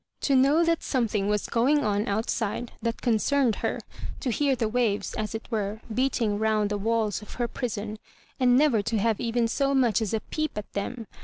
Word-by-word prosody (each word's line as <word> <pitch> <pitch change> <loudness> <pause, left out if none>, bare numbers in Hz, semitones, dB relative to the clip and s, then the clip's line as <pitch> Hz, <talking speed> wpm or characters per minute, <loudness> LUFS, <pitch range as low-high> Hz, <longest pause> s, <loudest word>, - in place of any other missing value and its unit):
To 275 - +2
know 285 +6 +4
that 335 -1 +1
something 220 -6 0
was 210 0 0
going 275 +6 +2
on 210 +2 0
outside 220 +2 -1
that 230 0 -3
con 235 -3 +3
cerned 265 -1 +2
her, - - -2 0.4
to 255 - -1
hear 275 +3 +2
the 235 -3 0
waves, 220 -3 0
as 215 0 -3
it 225 - -5
were, 210 -1 -2
beat 260 +3 +1
ing 210 -3 0
round 215 -1 +1
the 205 - 0
walls 220 -1 0
of 210 - -11
her 240 -1 -1
prison, 220 -4 -4 0.4
and 250 -1 +5
never 275 -7 +4
to 225 +2 -1
have 220 0 +1
even 235 0 +1
so 275 +4 +1
much 240 -6 +3
as 215 - -1
a - - 0
peep 310 -6 -3
at 210 - -6
them 225 +4 -4
230 Hz, 210 wpm, -26 LUFS, 210-255 Hz, 0.4 s, and